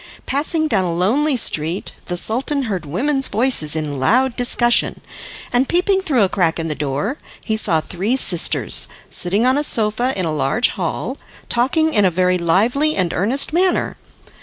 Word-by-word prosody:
Passing 310 Hz, +3 st, -1 dB
down 200 Hz, -10 st, 0 dB
a 175 Hz, -, -2 dB
lonely 250 Hz, -, +1 dB
street, 165 Hz, -4 st, -1 dB, 0.2 s
the 175 Hz, -, -3 dB
Sultan 265 Hz, +9 st, +1 dB
heard 190 Hz, -, -4 dB
women's 270 Hz, -, 0 dB
voices 220 Hz, -, +3 dB
in 150 Hz, -3 st, -4 dB
loud 250 Hz, -, +1 dB
discussion; 240 Hz, -1 st, +1 dB, 0.5 s
and 250 Hz, +2 st, +1 dB
peeping 380 Hz, +2 st, +1 dB
through 275 Hz, -, +1 dB
a -, -, +3 dB
crack 180 Hz, -4 st, 0 dB
in 165 Hz, -1 st, -4 dB
the -, -, -1 dB
door, 150 Hz, -, -4 dB, 0.3 s
he 220 Hz, -, -1 dB
saw 170 Hz, -7 st, +1 dB
three 195 Hz, +10 st, -2 dB
sisters, 175 Hz, -9 st, +3 dB, 0.2 s
sitting 200 Hz, +6 st, -1 dB
on 260 Hz, +3 st, +2 dB
a -, -, -1 dB
sofa 230 Hz, 0 st, +1 dB
in 185 Hz, -, -1 dB
a 160 Hz, -, -2 dB
large 150 Hz, -, +1 dB
hall, -, -, -4 dB, 0.3 s
talking 315 Hz, +7 st, +1 dB
in 205 Hz, -, +3 dB
a 190 Hz, -, +4 dB
very 180 Hz, +1 st, 0 dB
lively 230 Hz, -, +1 dB
and 180 Hz, -3 st, -1 dB
earnest 250 Hz, -, +1 dB
manner. 365 Hz, +2 st, +1 dB
220 Hz, 170 wpm, -18 LUFS, 175-270 Hz, 0.5 s, a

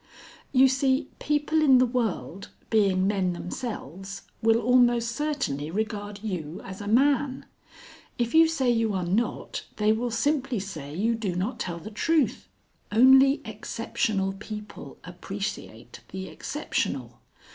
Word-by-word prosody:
"You 265 Hz, 0 st, +6 dB
see, 265 Hz, +1 st, +1 dB
people 300 Hz, +2 st, +1 dB
in 270 Hz, -4 st, +6 dB
the 255 Hz, -, +5 dB
world, 205 Hz, -, -3 dB, 0.2 s
being 195 Hz, -4 st, +3 dB
men 190 Hz, -3 st, +1 dB
themselves, 195 Hz, -, -6 dB, 0.2 s
will 225 Hz, 0 st, +4 dB
almost 240 Hz, 0 st, +3 dB
certainly 255 Hz, -, -2 dB
regard 205 Hz, +1 st, -4 dB
you 175 Hz, -4 st, -4 dB
as 190 Hz, +1 st, -8 dB
a 205 Hz, -, -6 dB
man. 270 Hz, +3 st, +2 dB, 0.7 s
If 235 Hz, -1 st, -1 dB
you 325 Hz, 0 st, +7 dB
say 270 Hz, -6 st, +1 dB
you 225 Hz, -2 st, +1 dB
are 185 Hz, -2 st, -1 dB
not, 210 Hz, +7 st, -1 dB
they 210 Hz, 0 st, +2 dB
will 235 Hz, +3 st, 0 dB
simply 270 Hz, +2 st, 0 dB
say 155 Hz, -7 st, -7 dB
you 220 Hz, +6 st, +1 dB
do 215 Hz, -6 st, -2 dB
not 215 Hz, +7 st, -2 dB
tell 170 Hz, -2 st, -3 dB
the 210 Hz, +6 st, -9 dB
truth. 310 Hz, +6 st, +1 dB, 0.4 s
Only 265 Hz, +5 st, +6 dB
exceptional 195 Hz, -3 st, -2 dB
people 210 Hz, +1 st, -9 dB
appreciate 195 Hz, +3 st, -6 dB
the 190 Hz, 0 st, -6 dB
exceptional. 300 Hz, -, -3 dB
220 Hz, 135 wpm, -26 LUFS, 195-260 Hz, 0.7 s, you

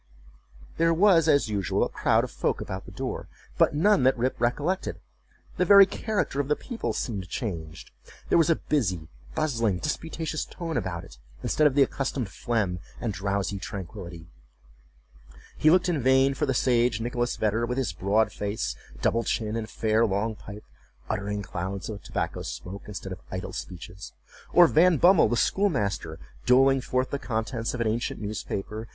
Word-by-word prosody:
There 165 Hz, 0 st, +3 dB
was, 170 Hz, -3 st, +5 dB
as 140 Hz, -5 st, +4 dB
usual, 100 Hz, -4 st, 0 dB
a -, -, +1 dB
crowd -, -, +2 dB
of -, -, -5 dB
folk -, -, -1 dB
about 95 Hz, 0 st, -6 dB
the -, -, -11 dB
door, -, -, -5 dB, 0.3 s
but -, -, +4 dB
none 205 Hz, +3 st, +4 dB
that 130 Hz, +1 st, +3 dB
Rip 125 Hz, +2 st, -1 dB
recollected. 145 Hz, +10 st, -1 dB, 0.6 s
The -, -, +3 dB
very 200 Hz, +2 st, +9 dB
character 205 Hz, -7 st, -2 dB
of 140 Hz, -, 0 dB
the 150 Hz, -, +2 dB
people 240 Hz, -, -4 dB
seemed 100 Hz, -6 st, -4 dB
changed. 80 Hz, -9 st, -5 dB, 0.4 s
There -, -, +3 dB
was 165 Hz, -, +3 dB
a 165 Hz, -, +5 dB
busy, 95 Hz, -, -1 dB, 0.3 s
bustling, 115 Hz, -, +1 dB
disputatious 160 Hz, -, -3 dB
tone 165 Hz, -3 st, -6 dB
about 90 Hz, -8 st, -2 dB
it, -, -, -14 dB, 0.2 s
instead 155 Hz, -, +3 dB
of 135 Hz, -, -1 dB
the 140 Hz, -, +6 dB
accustomed 135 Hz, -4 st, -2 dB
phlegm 105 Hz, -6 st, -1 dB, 0.2 s
and 115 Hz, -4 st, -2 dB
drowsy 100 Hz, 0 st, -2 dB
tranquillity. 90 Hz, -3 st, -7 dB, 1.3 s
He 155 Hz, -, +4 dB
looked 180 Hz, +2 st, +4 dB
in 165 Hz, -6 st, 0 dB
vain 130 Hz, +2 st, +4 dB
for 150 Hz, +2 st, -1 dB
the 135 Hz, -, 0 dB
sage 120 Hz, -2 st, +2 dB
Nicholas 120 Hz, +1 st, -1 dB
Vedder, 110 Hz, +2 st, 0 dB
with 125 Hz, +1 st, -2 dB
his 120 Hz, -9 st, -1 dB
broad 100 Hz, +5 st, +1 dB
face, 100 Hz, -, -3 dB, 0.3 s
double 115 Hz, 0 st, +2 dB
chin, 110 Hz, -1 st, -1 dB
and 110 Hz, -1 st, -4 dB
fair 110 Hz, +1 st, +1 dB
long 110 Hz, +1 st, 0 dB
pipe, 105 Hz, 0 st, -10 dB, 0.5 s
uttering 105 Hz, -1 st, -2 dB
clouds 95 Hz, +1 st, -5 dB
of 105 Hz, -2 st, -6 dB
tobacco -, -, -3 dB
smoke 95 Hz, +3 st, -7 dB
instead 100 Hz, -2 st, -7 dB
of 95 Hz, -, -7 dB
idle 95 Hz, -, -5 dB
speeches; 90 Hz, +2 st, -8 dB, 0.4 s
or 175 Hz, -, +8 dB
Van 170 Hz, +1 st, +4 dB
Bummel, 180 Hz, +4 st, +6 dB
the 120 Hz, -, +1 dB
schoolmaster, 110 Hz, -, 0 dB, 0.3 s
doling 135 Hz, +1 st, +5 dB
forth 130 Hz, +1 st, -1 dB
the 140 Hz, -, -2 dB
contents 115 Hz, -1 st, -2 dB
of 120 Hz, -, -3 dB
an 115 Hz, -, +1 dB
ancient 115 Hz, +2 st, -2 dB
newspaper. 105 Hz, +1 st, -4 dB
115 Hz, 170 wpm, -26 LUFS, 100-145 Hz, 1.3 s, very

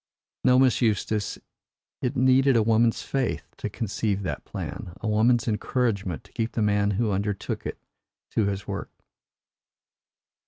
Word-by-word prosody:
No, 125 Hz, -, +5 dB
Miss 130 Hz, -1 st, +4 dB
Eustace, 110 Hz, -2 st, 0 dB, 0.6 s
it 130 Hz, +2 st, -1 dB
needed 130 Hz, +1 st, +4 dB
a 115 Hz, -, +4 dB
woman's 115 Hz, +1 st, +3 dB
faith 135 Hz, -3 st, -1 dB
to -, -, -3 dB
conceive 105 Hz, -2 st, -2 dB
that 90 Hz, -, -3 dB
plan 85 Hz, -, -6 dB
a 110 Hz, -, -4 dB
woman's 115 Hz, +3 st, +3 dB
encouragement 105 Hz, -5 st, -1 dB
to -, -, -20 dB
keep 115 Hz, 0 st, -2 dB
the 110 Hz, -, 0 dB
man 105 Hz, -1 st, +2 dB
who 115 Hz, -2 st, +1 dB
undertook 100 Hz, 0 st, -2 dB
it -, -, -5 dB, 0.5 s
to 110 Hz, -, +2 dB
his 100 Hz, -1 st, -3 dB
work." -, -, -4 dB
110 Hz, 145 wpm, -26 LUFS, 105-125 Hz, 0.6 s, No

